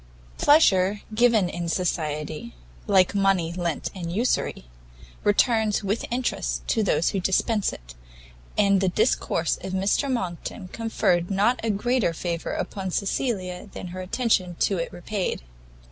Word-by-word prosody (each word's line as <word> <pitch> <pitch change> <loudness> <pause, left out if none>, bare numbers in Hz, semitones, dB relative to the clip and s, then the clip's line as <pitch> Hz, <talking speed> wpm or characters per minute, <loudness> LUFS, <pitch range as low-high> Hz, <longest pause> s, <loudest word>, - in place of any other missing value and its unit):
Pleasure 200 - +4
given 225 -4 +4
in 170 -1 -4
society, 155 -6 -2 0.3
like 190 -1 +4
money 195 -4 +2
lent 170 -3 -2
in 175 -4 -5
usury, 220 - -1 0.6
returns 215 0 +2
with 200 +3 -1
interest 245 +1 -2
to 225 - +2
those 170 -5 +2
who 195 - -1
dispense 200 +3 +1
it: - - -11 0.6
and 200 -1 +4
the 190 - +2
discourse 180 -5 +1
of 190 - -5
Mr 200 +9 +1
Monckton 185 -3 -4
conferred 190 -6 0
not 210 +5 +2
a 225 - 0
greater 220 -2 +1
favour 170 0 -3
upon 195 -2 -3
Cecilia 195 -1 -2
than 180 - -7
her 185 +1 -6
attention 185 -3 0
to 195 -3 +2
it 165 - -3
repaid. 185 - -3
190 Hz, 135 wpm, -25 LUFS, 175-215 Hz, 0.6 s, Pleasure